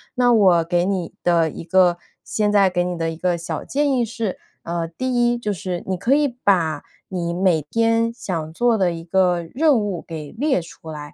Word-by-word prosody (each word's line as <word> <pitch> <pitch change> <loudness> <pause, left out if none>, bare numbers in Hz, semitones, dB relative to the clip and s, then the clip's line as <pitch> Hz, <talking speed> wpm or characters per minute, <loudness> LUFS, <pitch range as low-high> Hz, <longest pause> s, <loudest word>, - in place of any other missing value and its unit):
那 245 -1 +4
我 185 -6 +5
给 175 +1 +1
你 190 -3 -2
的 170 -3 +2
一 - - -8
个 175 0 +3 0.3
现 210 -1 0
在 195 -3 +4
给 175 -1 +1
你 180 -1 -3
的 165 0 -1
一 - - -7
个 175 +1 0
小 170 - -5
建 290 +1 0
议 245 -2 +2
是， 225 -4 -4 0.2
啊， 170 0 -3
第 255 +10 -3 0.2
一 240 - -1
就 210 -3 -2
是 180 -1 -4
你 190 - -1
可 245 +10 +2
以 295 -1 +3 0.2
把 165 -7 +2 0.3
你 170 -2 -2
每 175 -3 +2
天 230 0 +2
想 165 -8 -5
做 240 +2 +2
的 180 -3 +1
一 165 0 -7
个 175 -1 +1
任 295 -1 +4
务 205 -5 -2
给 155 -3 -7
列 265 - 0
出 165 -1 -11
来， 150 -1 -8
185 Hz, 220 characters per minute, -21 LUFS, 170-225 Hz, 0.3 s, 我